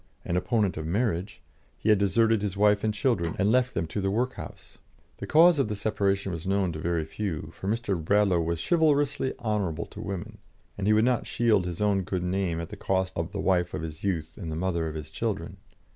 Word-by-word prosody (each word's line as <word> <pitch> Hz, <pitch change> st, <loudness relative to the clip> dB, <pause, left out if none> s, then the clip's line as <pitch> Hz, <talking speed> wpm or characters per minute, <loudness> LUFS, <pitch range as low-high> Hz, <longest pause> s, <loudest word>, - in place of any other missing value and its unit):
an 85 Hz, -, -1 dB
opponent 105 Hz, 0 st, +1 dB
of 80 Hz, -, -4 dB
marriage, 100 Hz, 0 st, -1 dB, 0.4 s
he 110 Hz, -, -1 dB
had 105 Hz, -2 st, +5 dB
deserted 110 Hz, +2 st, +3 dB
his 100 Hz, -2 st, -3 dB
wife 105 Hz, 0 st, +4 dB
and 110 Hz, -, +2 dB
children, 105 Hz, -6 st, 0 dB
and 100 Hz, +2 st, +2 dB
left 125 Hz, +1 st, +2 dB
them 85 Hz, -, 0 dB
to 80 Hz, +6 st, -4 dB
the 95 Hz, -, 0 dB
workhouse. 125 Hz, +6 st, -4 dB, 0.4 s
The -, -, -5 dB
cause 165 Hz, 0 st, +6 dB
of 135 Hz, -, +2 dB
the 105 Hz, -, -3 dB
separation 100 Hz, -2 st, 0 dB
was 85 Hz, +1 st, -5 dB
known 95 Hz, -2 st, +1 dB
to 80 Hz, -, -6 dB
very 85 Hz, -1 st, -1 dB
few, 80 Hz, -2 st, -4 dB
for 95 Hz, -, -7 dB
Mr. 105 Hz, -6 st, -1 dB
Bradlaugh 100 Hz, 0 st, +3 dB
was 85 Hz, 0 st, -1 dB
chivalrously 145 Hz, -5 st, +2 dB
honourable 100 Hz, -8 st, -1 dB
to -, -, -10 dB
women, 95 Hz, -3 st, -6 dB, 0.4 s
and 100 Hz, 0 st, -2 dB
he 105 Hz, -, +5 dB
would 110 Hz, +2 st, +4 dB
not 125 Hz, -1 st, +1 dB
shield 110 Hz, -6 st, +2 dB
his 90 Hz, +2 st, -5 dB
own 100 Hz, -2 st, +2 dB
good 90 Hz, -1 st, -3 dB
name 90 Hz, -2 st, -1 dB
at 85 Hz, -, -5 dB
the -, -, -7 dB
cost 95 Hz, -1 st, 0 dB
of 85 Hz, -, -1 dB
that -, -, -7 dB
of -, -, -21 dB
the -, -, -2 dB
wife 90 Hz, -2 st, +2 dB
of 80 Hz, -, -4 dB
his 80 Hz, -1 st, -7 dB
youth 85 Hz, -4 st, -2 dB
and 80 Hz, -4 st, -4 dB
the -, -, -3 dB
mother 85 Hz, -1 st, -1 dB
of 80 Hz, -, -5 dB
his 75 Hz, -2 st, -7 dB
children. -, -, -3 dB
95 Hz, 230 wpm, -27 LUFS, 85-110 Hz, 0.4 s, cause